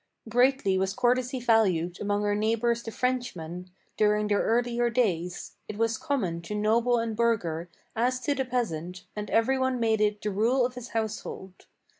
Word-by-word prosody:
Greatly 245 -4 +3
was 190 0 -1
courtesy 250 +1 +1
valued 190 -8 +2
among 205 0 0
our 205 - +2
neighbors 230 +3 +1
the 230 - -6
Frenchmen, 185 -9 -3 0.3
During 210 0 +3
their 205 - +2
earlier 240 +1 +1
days; 180 -8 -1
it 210 - -6
was 225 0 0
common 185 -12 -1
to 210 +5 -5
noble 230 +3 +2
and 230 -1 -2
burgher, 180 -8 0 0.3
As 250 +3 +1
to 290 +2 +1
the 270 -1 -1
peasant, 185 -8 -3
and 210 -1 -5
every 260 +4 +2
one 260 -1 0
made 220 -2 +2
it 210 0 +2
the 210 - -2
rule 235 +6 +2
of 250 - -3
his 250 -1 -8
household. 210 -4 -5
225 Hz, 170 wpm, -27 LUFS, 200-245 Hz, 0.3 s, Greatly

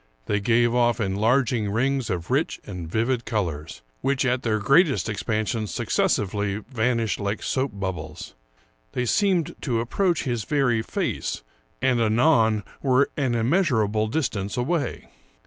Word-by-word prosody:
They 105 - 0
gave 120 +3 +3
ofif 120 -2 +2
enlarging 110 +2 +1
rings 130 +4 0
of 85 -3 -3
rich - - 0
and 90 -5 -7
vivid 115 +5 0
colors, 80 - -3 0.2
which 135 0 +1
at 125 0 +1
their 110 -3 0
greatest 140 - +3
expansion 110 +1 -1
succes - - +1
sively 100 0 -2
vanished 115 -2 0
like 100 +1 -2
soap 135 +1 0
bubbles; 95 -2 -5 0.6
they 125 - -1
seemed 185 - +1
to 120 -5 0
approach 170 +9 0
his 120 -5 -2
very 130 -5 +1
face, - - -3 0.4
and 130 -2 +3
anon 110 -2 +3 0.2
were 135 0 +3
an 130 -5 0
immeasurable 115 - +2
distance 110 -7 -2
away. 145 +5 -2
115 Hz, 135 wpm, -24 LUFS, 105-130 Hz, 0.6 s, gave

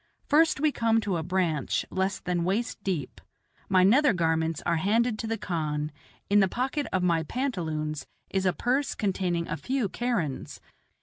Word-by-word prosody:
First 315 0 +4
we 305 +1 +3
come 225 -3 +2
to 195 -5 -1
a - - -1
branch 170 -3 0
less 190 +1 0
than 180 -2 -1
waist 200 +3 -1
deep. 165 -9 -3 0.5
My 185 -1 +5
nether 255 +7 +5
garments 160 -2 0
are 170 - +2
handed 220 +5 +1
to 225 - -3
the 225 0 -1
khan; 150 -5 -2 0.4
in 205 +1 +4
the 195 - +5
pocket 265 +8 -2
of 185 -1 +1
my 170 -2 +3
pantaloons 160 - -3 0.2
is 190 -1 +1
a - - +4
purse 265 +4 0
containing 180 -4 -1
a - - -3
few 255 -6 -1
kerans. 210 - -2
190 Hz, 170 wpm, -27 LUFS, 165-235 Hz, 0.5 s, My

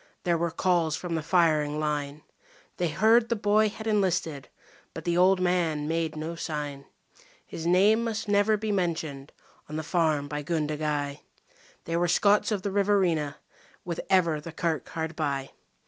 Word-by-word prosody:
There 175 -1 +2
were 170 +1 0
calls 165 -2 +1
from 175 0 -5
the 160 - -1
firing 155 -3 +2
line; 150 -1 -3 0.5
They 175 - 0
heard 220 +7 +3
the 235 - +1
boy 210 +1 +3
had 220 +1 -9
enlisted, 180 - 0 0.5
but - - -6
the 170 -1 +1
old 185 +1 +4
man 170 -5 0
made 160 -1 -1
no 155 +2 -4
sign. 145 -4 -5 0.6
His 165 0 -6
name 205 +6 +4
must 220 -1 -3
never 205 +1 +3
be 215 0 -2
mentioned 160 -7 -2 0.4
on 155 - -6
the 155 - -3
farm 155 -3 +1
by 150 0 -4
Gundagai 150 -2 -2 0.7
They 165 0 -1
were 175 +1 +2
Scots 205 +5 +3
of 200 -3 -1
the 200 - -2
Riverina 190 -7 +1 0.5
with 170 -2 -4
ever 170 -5 +3
the 165 - -8
kirk 160 -3 -2
hard 160 0 -4
by. 140 -4 -2
165 Hz, 165 wpm, -27 LUFS, 150-190 Hz, 0.7 s, old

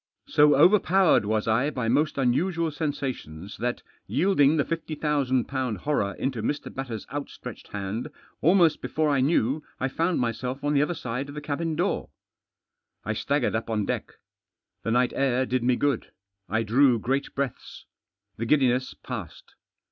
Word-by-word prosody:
So 150 - +5
overpowered 180 - +5
wets 110 0 0
I 120 +6 +2
by 125 -6 -3
most 145 +6 +2
uiiu&ual 160 +6 +1
setisatioiis 125 - -4
that, 120 +1 -2 0.2
yielding 160 -5 +3
the 145 - +2
£50,000 140 -7 -1
horror 100 -5 -1
into 130 -4 -2
Mr. 145 +7 -3
Batters' 125 -5 -5
out 145 0 -4
stretched - - -9
hand, 105 +7 -4 0.3
almost 170 -2 +4
before 155 -1 0
I 140 -2 +2
knew 140 0 +2 0.2
I 130 - 0
found 165 +5 0
tnyself 125 +3 -2
on 145 0 +1
the 140 - +4
other 170 +4 0
side 125 +1 -4
of 140 - -9
the - - -3
cabin 155 +2 -2
door. 175 +5 -1 1.0
I 110 - -1
staggered 140 +4 0
up 115 +1 -3
m 105 -2 0
deck. - - -3 0.7
The - - -3
night 125 +2 +3
afr 130 -1 +1
did 130 0 0
me 125 0 +3
good. 140 -2 -1 0.4
I 110 +2 +1
drew 125 +3 +4
great 135 +6 -2
breaths. 140 -3 -4 0.5
The 115 - -3
giddiness 130 -2 +2
passed. - - -8
135 Hz, 155 wpm, -26 LUFS, 120-150 Hz, 1.0 s, So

